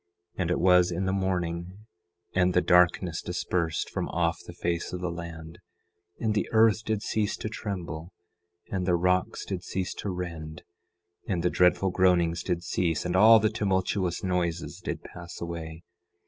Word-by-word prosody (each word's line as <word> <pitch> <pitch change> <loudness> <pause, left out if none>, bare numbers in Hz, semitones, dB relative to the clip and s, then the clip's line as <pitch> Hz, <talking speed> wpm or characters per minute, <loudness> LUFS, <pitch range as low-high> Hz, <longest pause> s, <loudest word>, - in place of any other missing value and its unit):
And 90 -3 -1
it 90 - +1
was 90 0 +5
in 90 +2 -2
the 95 - 0
morning, 90 +1 -2 0.5
and 90 -1 +2
the 90 - +5
darkness 90 -1 +3
dispersed 85 -2 -1
from - - -3
off 85 -1 0
the - - -8
face 85 -1 -2
of 90 - -3
the 90 -1 -2
land, 85 -1 -8 0.6
and 110 -2 0
the 105 - -1
earth 110 0 +4
did 110 -1 -2
cease 105 -2 -1
to 110 - -4
tremble, 90 -6 -5 0.6
and 95 -2 -2
the 90 - +4
rocks 90 +1 +1
did 95 -2 -4
cease 95 +1 -3
to 100 - -5
rend, 85 -3 -6 0.6
and 90 -4 -1
the 90 - +2
dreadful 90 +1 +3
groanings 85 -2 +3
did 85 -1 -2
cease, 85 -3 -1
and 90 0 -1
all 110 +4 +8
the 110 0 +1
tumultuous 95 -4 0
noises 90 -2 -1
did - - -4
pass 85 -1 -10
away. 85 -1 -6
90 Hz, 165 wpm, -27 LUFS, 85-95 Hz, 0.6 s, all